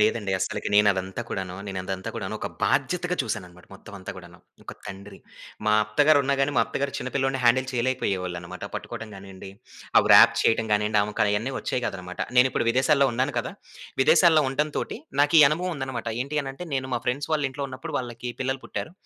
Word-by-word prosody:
లేదండి. 105 -1 +1
అస్సలకి 95 - -2
నేనదంతా 100 0 +2
కూడాను 95 -2 -4
నేనదంతా 95 -1 -4
కూడాను - - -4
ఒక - - -3 0.2
బాధ్యతగా 180 +5 0
చూసాననమాట 90 -6 -6
మొత్తం 100 - -14
అంతా 95 - -7
గూడాను. - - -13 0.3
ఒక - - -7
తండ్రి 100 +1 -9 0.5
మా 105 - +4
అత్తగారున్న 140 +4 +3
గానీ 135 +1 +1
మా - - +5
అత్తగారు 140 0 -3
చిన్నపిల్లోడిని 135 +1 -1
హ్యాండిల్ 130 +2 +4
చేయలేకపోయేవాళ్ళనమాట. 90 -8 -2
పట్టుకోడం 115 - -6
గానియ్యండి, 95 0 -10 0.5
ఆ - - +9
వ్రాప్ - - +8
చేయటం 115 0 +2
గానియండి 105 0 +2
ఆమెకయన్ని 105 +4 0
వచ్చేవి 125 - -2
గాదనమాట. 90 -1 -5 0.2
నేనిప్పుడు 125 -2 +3
విదేశాల్లో 135 +3 +3
ఉన్నాను 130 +4 0
కదా! - - -3 0.5
విదేశాల్లో 160 +1 +5
ఉండటం 150 +3 -1
తోటి - - -3 0.2
నాకీ 150 +3 +5
అనుభవముందన్నమాట. 150 -7 -3 0.2
ఏంటి 140 +3 -5
అనంటే, 135 +6 -7
నేను 130 -1 -1
మా - - +1
ఫ్రెండ్స్ 135 +5 -1
వాళ్ళ 155 -1 +1
ఇంట్లో 140 +2 -5
ఉన్నపుడు 130 0 -7
వాళ్ళకి 120 -1 -5
పిల్లలు 130 +1 -2
పుట్టారు. 160 - -5
125 Hz, 160 wpm, -25 LUFS, 100-140 Hz, 0.5 s, ఆ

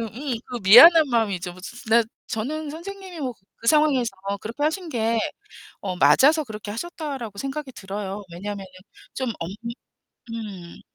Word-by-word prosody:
음, 240 +4 -4
그 245 - -4
미안한 305 - +9
마음이죠. 200 -7 0
뭐 185 - -14
지 210 - -9
지 - - -11
지나 230 +1 +5 0.3
저는 295 +7 -3
선생님이 370 +2 -8
뭐 255 -3 -3 0.3
그 230 - -9
상황에서 290 -5 +4 0.3
그렇게 230 +6 -5
하신 330 +4 0
게 230 -3 +1 0.6
어 185 -2 -3
'맞아서 275 - +5
그렇게 215 -4 -8
하셨다.'라고 270 - -5
생각이 275 +2 -4
들어요. 200 -1 -5
왜냐면은 200 +2 -6 0.5
좀 260 -3 -2
엄 165 - -4 0.8
음. 200 -7 -8
235 Hz, 315 characters per minute, -24 LUFS, 205-300 Hz, 0.8 s, 미안한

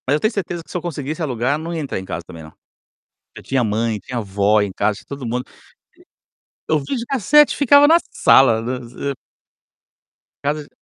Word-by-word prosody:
Mas 140 - +3
eu - - 0
tenho 215 +6 0
certeza 175 -4 -4
que, - - -16
se - - -2
eu - - -5
conseguisse 155 -1 -5
alugar, 130 -1 -1
não 165 +2 -6
ia 165 - -3
entrar 140 -9 -4
em 95 - -9
casa, 85 -1 -5
também, 80 -2 -11
não. 80 - -13 0.8
Já - - -8
tinha 135 -2 0
mãe, 110 0 -1
tinha 125 - -6
avó 105 0 +1
em 100 -1 -2
casa, 105 +2 -1
todo 140 -2 -7
mundo 125 +2 -3 1.2
e - - +2
o 155 - +3
videocassete 270 - +2
ficava 285 +1 +6
na 325 +2 +6
sala. 115 -4 +5 1.8
Casa 150 +2 -1
de - - -18
140 Hz, 185 wpm, -20 LUFS, 110-170 Hz, 1.8 s, ficava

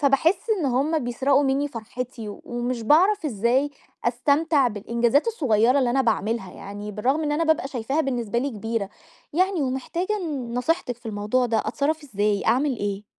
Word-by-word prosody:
فباحس 325 - +2
إن 300 - 0
هم 280 +6 +1
بيسرقوا 265 +3 +2
مني 275 +2 +1
فرحتي، 245 0 -6 0.2
ومش 240 0 -3
باعرف 350 - +4
إزاي 245 +4 +1 0.3
أستمتع 290 -3 +2
بالإنجازات 235 - +1
الصغيرة 255 - +3
اللي 250 -3 +2
أنا 270 +2 +2
باعملها 225 -3 -1
يعني، 205 +1 -7
بالرغم 265 +10 0
إن 295 -1 0
أنا 330 +2 +1
بابقى 315 -4 +1
شايفاها 270 +4 -1
بالنسبة 240 -4 -1
لي 275 +3 -1
كبيرة. 225 -2 -3 0.4
يعني 370 0 +1
ومحتاجة 335 +10 -2
ن 255 -6 -4
نصيحتك 250 -1 0
في 240 - -14
الموضوع 215 +4 0
ده، 225 -1 +1
أتصرف 305 +6 -1
إزاي؟ 205 -5 0
أعمل 265 0 +2
إيه؟ 205 0 -3
255 Hz, 160 wpm, -24 LUFS, 230-295 Hz, 0.4 s, باعرف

